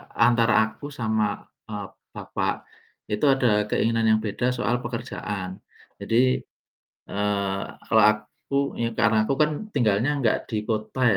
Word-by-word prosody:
antara 120 -1 +4
aku 110 +6 -6
sama, 110 -6 -1 0.2
eee, 105 -2 -5 0.3
bapak, - - -3 0.5
itu 105 +7 +1
ada 115 -6 +3
keinginan 115 +1 +1
yang 110 0 +4
beda 125 +4 -1
soal 120 0 0
pekerjaan. 105 -5 -5 0.4
Jadi, 125 +3 +2 0.7
eee, 100 -1 -1 0.3
kalau 110 -2 +6
aku, 105 +6 -1 0.2
ya 115 0 0
karena 110 -1 +3
aku 135 - +1
kan 150 - +3 0.2
tinggalnya 115 0 +2
enggak 125 -6 0
di 105 -1 -2
kota 110 +4 -3
110 Hz, 130 wpm, -25 LUFS, 105-120 Hz, 0.7 s, kalau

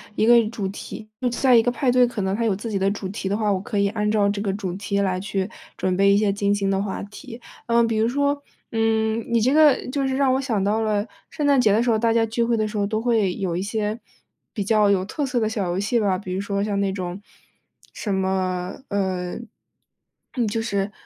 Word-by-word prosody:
一 215 - +2
个 240 - +7 0.2
主 215 -4 -3
题 200 +2 -8
就 250 - +1
在 250 +1 +3
一 230 - +6
个 245 - +1
派 255 +1 0
对 250 0 +5
可 240 -3 -4
能 190 +1 0
它 230 - -1
有 220 -3 +2
自 205 +4 -5
己 205 - -1
的 195 +1 +1
主 200 -1 -4
题 195 0 -4
的 200 - 0
话， 215 -2 +1
我 190 - +1
可 210 0 -2
以 200 - +3
按 210 0 -1
照 210 -2 +3
这 200 0 -1
个 200 -2 -1
主 195 -3 -4
题 200 +1 -2
来 190 -2 +1
去 195 0 -3 0.3
准 185 -1 0
备 195 +1 +4
一 - - +4
些 205 -1 +2
精 200 0 +1
心 200 -1 0
的 195 0 +1
话 205 - -4
题。 230 +4 -10 0.3
呃， 235 0 +4
比 230 -1 -1
如 220 +1 +2
说， 285 +2 0 0.3
嗯， 225 0 +1
你 235 - +3
这 250 +5 +2
个 300 -3 +5
就 275 0 -1
是 265 0 -1
让 270 -2 +3
我 265 - +1
想 230 -7 -1
到 210 +3 +1
了 215 -1 0 0.2
圣 295 -2 -2
诞 280 -2 +4
节 215 -4 +4
的 215 +3 +3
时 240 - 0
候， 225 - +3
大 230 +1 +2
家 225 0 +3
聚 230 +1 -1
会 230 0 +1
的 215 -1 0
时 210 0 -5
候 200 - +1
都 215 +2 -1
会 225 -6 +1
有 185 -5 -2
一 180 - -1
些 210 +1 -2 0.6
比 205 -3 -3
较 210 -1 +3
有 190 -2 +2
特 290 +8 -3
色 255 -2 -1
的 220 - +1
小 215 -4 -2
游 175 +2 -1
戏 220 +4 +1
吧。 195 -3 +1
比 185 -1 -6
如 190 - -2
说 200 0 -2
像 205 -1 -1
那 195 -1 0
种， 185 0 -5 0.7
什 205 - -3
么， 185 0 -1
呃， 185 -3 -2 1.0
嗯， 235 -3 +1
就 225 +2 -1
是 200 -3 -2
210 Hz, 275 characters per minute, -23 LUFS, 195-230 Hz, 1.0 s, 个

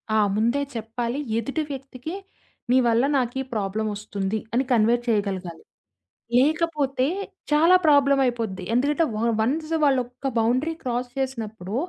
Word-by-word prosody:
ఆ! - - +4 0.2
ముందే 235 +6 +1
చెప్పాలి. 235 +3 -3 0.2
ఎదుటి 275 +7 -2
వ్యక్తికి 270 +3 -7 0.6
నీ 255 - +5
వల్ల 230 +2 +3
నాకీ 255 +1 -1
ప్రాబ్లమొస్తుంది 205 0 -2
అని 260 +3 +2
కన్వే 230 0 +4
చేయగలగాలి. 195 -6 -2 0.7
లేకపోతే 290 -2 +1 0.5
చాలా 330 +5 +6
ప్రాబ్లమయిపోద్ది. 260 -9 +2
ఎందుకంటే 290 +6 +2
వాళ్ళు 230 +1 +1
వన్స్ 310 +7 -1
వాళ్ళు 265 -2 +3
ఒక 255 +2 -5
బౌండరీ 255 +8 +1
క్రాస్ 245 0 -2
చేసినప్పుడు, 220 -6 -4
245 Hz, 115 wpm, -24 LUFS, 220-275 Hz, 0.7 s, చాలా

